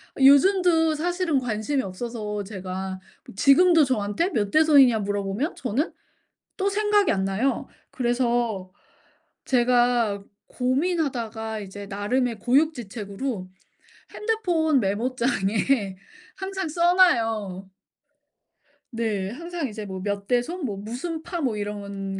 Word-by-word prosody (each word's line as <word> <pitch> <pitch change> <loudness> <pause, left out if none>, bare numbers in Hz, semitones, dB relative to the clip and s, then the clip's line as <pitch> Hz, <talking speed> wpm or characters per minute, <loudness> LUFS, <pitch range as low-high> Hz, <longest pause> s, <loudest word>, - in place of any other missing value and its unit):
아 - - -6
요즘도 325 +2 +5
사실은 350 -2 0
관심이 245 +4 -1
없어서 210 +1 -5
제가 190 -1 -6 0.3
뭐 - - -13
지금도 320 - +5
저한테 245 - 0
몇 205 - -1
대손이냐 285 -7 +6
물어보면 205 - -2
저는 255 - -2 0.7
또 395 0 0
생각이 415 0 +2
안 190 -2 0
나요. 215 +8 -1 0.2
그래서 240 -6 -1 0.7
제가 240 -4 +2 0.2
고민하다가 250 -6 -1
이제 200 0 -8
나름의 220 +3 -1
고육지책으로 240 - -1 0.7
핸드폰 345 - +1
메모장에 215 -1 0 0.4
항상 385 -2 -4
써놔요. 230 - +2 1.2
네. 210 -4 -1
항상 335 +2 -5
이제 215 0 -7
뭐 190 -1 -6
몇 200 -1 -3
대손 265 +7 -1
뭐 205 -4 -3
무슨 255 - -5
파 345 -1 -4
뭐 250 -8 0
이런 200 -2 -5
240 Hz, 240 characters per minute, -24 LUFS, 205-310 Hz, 1.2 s, 대손이냐